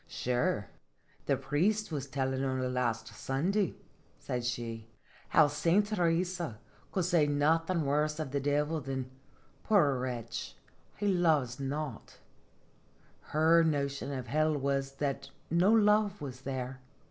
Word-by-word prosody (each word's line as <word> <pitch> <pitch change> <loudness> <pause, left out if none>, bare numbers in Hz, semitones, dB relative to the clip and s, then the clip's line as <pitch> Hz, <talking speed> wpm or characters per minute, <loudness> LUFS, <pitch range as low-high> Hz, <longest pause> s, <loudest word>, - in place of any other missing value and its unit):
" - - -33
Sure, 120 -4 0 0.6
the - - +2
priest 175 +10 0
was 140 -3 -3
tellin' 130 -1 -1
only 130 -1 0
last 125 -3 -1
Sun 135 +8 -1
day," 200 -3 +1 0.4
said 125 -1 -3
she, 115 -2 -4 0.2
" - - -27
how 155 - +6
Saint 165 +7 +2
Theresa 175 - 0 0.3
could 185 -3 0
say 170 -4 +3
nothing 160 +3 +2
worse 150 +2 +1
of 150 -4 -3
the 140 - 0
Divil 150 +3 0
than 130 -2 -4 0.3
' - - -33
Poor 150 -11 +4
wretch, 120 -2 -4 0.4
he 205 - -1
loves 155 -10 +2
not/ 140 -2 -4 1.1
Her 160 +2 +4
notion 140 -3 -1
of 130 -3 -4
hell 155 +4 +1
was 135 0 -1
that 135 -1 -3 0.2
no 175 +5 +4
love 210 -2 +4
was 130 -3 -7
there. 130 -1 -4
145 Hz, 140 wpm, -31 LUFS, 130-165 Hz, 1.1 s, how